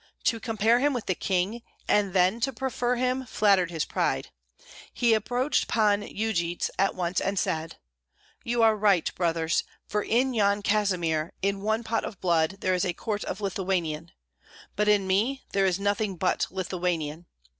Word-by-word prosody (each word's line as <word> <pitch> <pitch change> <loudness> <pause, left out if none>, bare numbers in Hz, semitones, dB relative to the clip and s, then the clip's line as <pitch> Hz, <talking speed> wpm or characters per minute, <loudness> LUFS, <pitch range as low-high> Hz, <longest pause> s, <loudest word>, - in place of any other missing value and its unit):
To 225 - +1
compare 225 +1 +2
him 285 +2 +2
with 245 -4 -3
the 185 - +1
king, 190 +6 -1 0.3
and 205 -2 +2
then 185 +4 +3
to 270 +3 0
prefer 250 -1 -1
him, 255 +1 0
flattered 200 -5 +3
his 165 -3 -2
pride; - - -1 0.6
he 235 -2 +2
approached 245 +6 0
Pan 210 -2 +2
Yujits 200 -5 -2
at 195 - +2
once 180 0 -1
and 195 +1 -1
said, 160 -2 -2 0.7
"You 235 0 +1
are 220 -1 +5
right, 200 -5 +2
brothers, 165 -2 0 0.2
for 210 - -1
in 250 +5 +1
Yan 205 -2 +2
Kazimir, 180 -7 0
in 200 0 0
one 220 +3 0
pot 225 0 -1
of 200 - -7
blood 170 +1 +1
there 185 - +1
is 180 - +1
a 180 - 0
quart 210 +3 -3
of - - -5
Lithuanian, 180 -5 -2 0.6
but 210 0 +1
in 205 -2 +4
me 215 +9 0
there 195 -1 +2
is 185 0 0
nothing 205 0 0
but 180 +1 0
Lithuanian. 175 -3 -3
200 Hz, 165 wpm, -27 LUFS, 180-225 Hz, 0.7 s, are